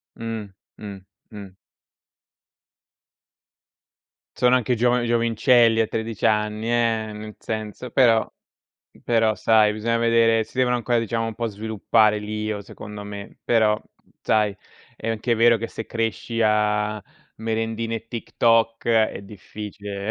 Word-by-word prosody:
Mh. 110 -3 -6 0.2
Mh, 100 -3 -9 0.3
mh. 100 -3 -9 2.9
Sono 125 0 +4
anche 125 0 +1
giova 120 +1 +2
giovincelli 115 0 +3
a 110 - 0
13 110 0 -4
anni, 105 0 0
eh, 115 -2 +1
nel 105 0 -9
senso 110 +3 -6
però 115 -4 +4 0.7
però 115 -2 +2
sai 110 -1 +3
bisogna 115 +2 -1
vedere, 115 -1 +3
si - - -19
devono 125 -1 +3
ancora 120 0 0
diciamo, 115 0 -2
un 115 - -5
po' 115 - -2
sviluppare 110 0 +1
l'io, 105 0 -4
secondo 105 +1 -9
me; 100 0 -9
però 110 -2 +2 0.4
sai, 105 -2 +1 0.4
è 115 - -5
anche 115 +2 0
vero 115 +1 +5
che 115 +1 -4
se 110 - -7
cresci 115 +1 -3
a 105 0 +1 0.3
merendine 115 0 -2
e 115 - -10
TikTok 115 -1 +1
è 110 -3 +2
difficile. 100 +1 -7
110 Hz, 125 wpm, -23 LUFS, 105-115 Hz, 2.9 s, vero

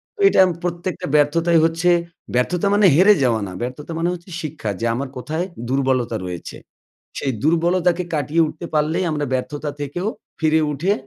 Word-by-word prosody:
তো 410 - -24
এটা 395 - +3
আম 180 - 0
প্রত্যেকটা 175 +1 -3
ব্যর্থতাই 165 +3 +3
হচ্ছে 165 +2 +1 0.5
ব্যর্থতা 175 +10 +1
মানে 205 -1 +4
হেরে 195 +5 +7
যাওয়া 115 -4 +2
না, - - -7
ব্যর্থতা 130 +6 -5
মানে 170 +1 +1
হচ্ছে 175 +1 -10
শিক্ষা 150 -8 -5
যে 115 - -2
আমার 135 +2 -3
কোথায় 160 +7 -3 0.2
দুর্বলতা 130 -3 +1
রয়েছে 90 -2 -7 0.6
সেই 135 - -1
দুর্বলতাকে 170 +2 +2
কাটিয়ে 150 +3 +1
উঠতে 155 +3 -7
পারলেই 155 +4 +1
আমরা 150 -1 -1
ব্যর্থতা 145 +3 -3
থেকেও 175 +8 -3 0.3
ফিরে 160 0 +3
উঠে 180 +9 +1
155 Hz, 165 wpm, -21 LUFS, 140-175 Hz, 0.6 s, হেরে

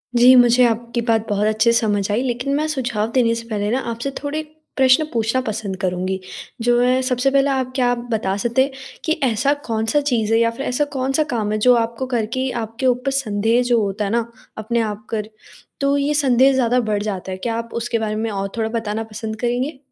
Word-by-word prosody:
जी, 245 +2 +7
मुझे 245 0 +6
आपकी 235 +1 -1
बात 225 -1 +1
बहुत 205 +1 +1
अच्छे 220 +2 +3
से 230 - +3
समझ 205 -3 0
आई 215 +4 +1
लेकिन 250 +2 -2
मैं 305 +2 0
सुझाव 240 -7 -2
देने 235 -2 +2
से 230 0 -7
पहले 210 -2 -2
ना, 255 - +1
आपसे 235 +2 -4
थोड़े 290 +2 -2 0.4
प्रश्न 265 +3 +5
पूछना 230 +2 +1
पसंद 215 -5 -4
करूँगी। 185 +1 -1 0.4
जो 240 +1 +3
है 255 +1 +3
सबसे 255 +1 +1
पहले 275 0 +3
आप 260 -2 -1
क्या 250 -2 +2
आप 245 0 -4
बता 210 -4 0
सकते 235 +5 +2
हैं, 275 - -3 0.3
कि 315 - 0
ऐसा 260 +3 +2
कौन-सा 225 +5 0
चीज़ 230 -6 0
है 225 - +4
या 230 0 +3
फ़िर 250 +4 -6
ऐसा 250 +4 0
कौन-सा 270 +3 +1
काम 215 -3 -1
है, 215 - 0
जो 250 +4 +5
आपको 230 +2 -1
करके 250 +2 -1
आपके 225 +4 -5
ऊपर 250 +2 +1
संदेह 225 -3 +1
जो 240 -2 +2
होता 205 +1 -2
है 200 - -2
ना, 235 0 -1 0.3
अपने 220 +2 -1
आप 215 0 -4
कर, 215 -1 -3 0.5
तो 280 0 +2
ये 285 +1 0
संदेह 270 -2 +4
ज़्यादा 250 -1 +2
बढ़ 215 -3 -1
जाता 190 -3 -4
है? 185 - -4
क्या 225 +4 -3
आप 230 0 -5
उसके 235 -1 -1
बारे 215 -1 -2
में 220 +1 -2
और 195 0 -3
थोड़ा 220 -1 0
बताना 220 0 -3
पसंद 220 0 -5
करेंगे? 250 +4 -1
235 Hz, 220 wpm, -20 LUFS, 220-255 Hz, 0.5 s, जी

